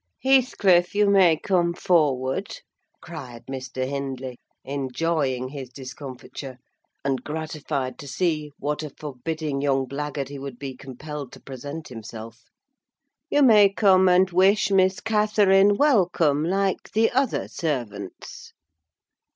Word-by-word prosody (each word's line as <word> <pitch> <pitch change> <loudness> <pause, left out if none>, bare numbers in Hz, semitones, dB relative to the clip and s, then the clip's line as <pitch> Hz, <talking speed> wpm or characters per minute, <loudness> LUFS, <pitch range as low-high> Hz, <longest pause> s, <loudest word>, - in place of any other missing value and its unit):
"Heathcliff, 205 -10 +3
you 205 0 +4
may 180 -5 +5
come 175 -1 0
forward," 150 - +1 0.4
cried 130 -9 -9
Mr. 130 -1 -4
Hindley, 135 -2 -5 0.2
enjoying 135 -1 -1
his 135 -2 -7
discomfiture, 130 0 -9 0.5
and 135 -2 -1
gratified 150 -4 -4
to 145 - -9
see 150 +1 -1
what 150 +2 -2
a 155 - -5
forbidding 150 +1 -4
young 135 -2 +1
blackguard 140 0 -4
he 140 -1 -7
would 135 -2 -7
be 135 -1 -6
compelled 135 +1 -8
to - - -11
present 145 +4 -8
himself. 115 0 -10 0.8
"You 290 - +3
may 210 -5 +7
come 190 -2 +4
and 180 +1 +5
wish 195 +3 +3
Miss 190 0 +3
Catherine 205 -2 +3
welcome, 175 - +3
like 195 +2 -1
the 225 +1 +3
other 265 +1 0
servants." 120 - -5
150 Hz, 120 wpm, -24 LUFS, 130-185 Hz, 0.8 s, may